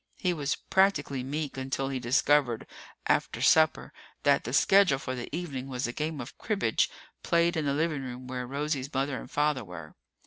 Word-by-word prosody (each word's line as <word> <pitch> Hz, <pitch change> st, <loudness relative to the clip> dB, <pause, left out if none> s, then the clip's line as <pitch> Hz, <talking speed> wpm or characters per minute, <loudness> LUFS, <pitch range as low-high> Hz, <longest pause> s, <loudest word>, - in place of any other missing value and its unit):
He 180 Hz, -1 st, 0 dB
was 150 Hz, -2 st, -1 dB
practically 150 Hz, -9 st, +1 dB
meek 145 Hz, +2 st, -4 dB
until 135 Hz, +1 st, -2 dB
he 135 Hz, -1 st, -2 dB
discovered 125 Hz, 0 st, +2 dB, 0.4 s
after -, -, +1 dB
supper 160 Hz, 0 st, +3 dB, 0.3 s
that 140 Hz, -1 st, +3 dB
the 120 Hz, -, -3 dB
schedule 195 Hz, +1 st, +5 dB
for 130 Hz, -1 st, -5 dB
the 125 Hz, -1 st, -5 dB
evening 140 Hz, -5 st, -4 dB
was 130 Hz, -1 st, -3 dB
a 120 Hz, -, -3 dB
game 155 Hz, +1 st, -3 dB
of 120 Hz, -, -7 dB
cribbage 200 Hz, -, +1 dB, 0.3 s
played 170 Hz, +1 st, +2 dB
in 160 Hz, -2 st, -1 dB
the 140 Hz, -, +1 dB
living 155 Hz, -2 st, 0 dB
room 125 Hz, -1 st, -7 dB
where 125 Hz, -1 st, -5 dB
Rosie's 140 Hz, 0 st, -2 dB
mother 135 Hz, 0 st, -1 dB
and -, -, -10 dB
father 150 Hz, -3 st, +1 dB
were. 85 Hz, -5 st, -10 dB
140 Hz, 180 wpm, -29 LUFS, 130-155 Hz, 0.4 s, schedule